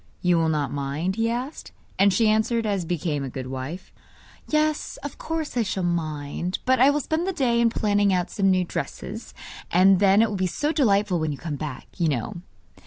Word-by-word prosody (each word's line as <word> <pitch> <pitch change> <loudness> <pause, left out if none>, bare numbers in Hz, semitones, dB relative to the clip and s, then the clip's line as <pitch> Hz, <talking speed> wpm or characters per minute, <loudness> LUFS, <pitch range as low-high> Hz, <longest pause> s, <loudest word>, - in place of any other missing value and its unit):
'You 180 -1 +4
will 165 -1 +2
not 150 -4 -1
mind?' 145 +6 -2
he 225 +1 +1
asked. 250 +5 -5 0.3
And 200 +1 +6
she 220 +4 +3
answered 220 +2 +2
as 200 -4 -1
became 160 -4 -2
a 135 - -4
good 130 0 -6
wife: 135 +8 -6 0.5
'Yes, 305 0 0
of 285 - -7
course 320 -3 -3
I 240 - +2
shall 195 -3 -2
mind; 165 0 -2
but 260 -1 +3
I 265 +3 +7
will 295 +1 +1
spend 320 +6 -1
the - - +1
day 240 -8 +1
in 235 - +4
planning 205 -3 +2
out 180 0 0
some 195 -1 +2
new 185 -1 +3
dresses; - - -6 0.3
and 185 +1 +5
then 200 +2 +5
it 230 - +1
will 200 - -2
be 185 0 +1
so 295 - -1
delightful 205 - +2
when 155 -1 -1
you 145 - -5
come 155 -1 -4
back, 145 -2 -6
you 170 -4 +2
know! 140 +5 -3
190 Hz, 210 wpm, -24 LUFS, 160-230 Hz, 0.5 s, I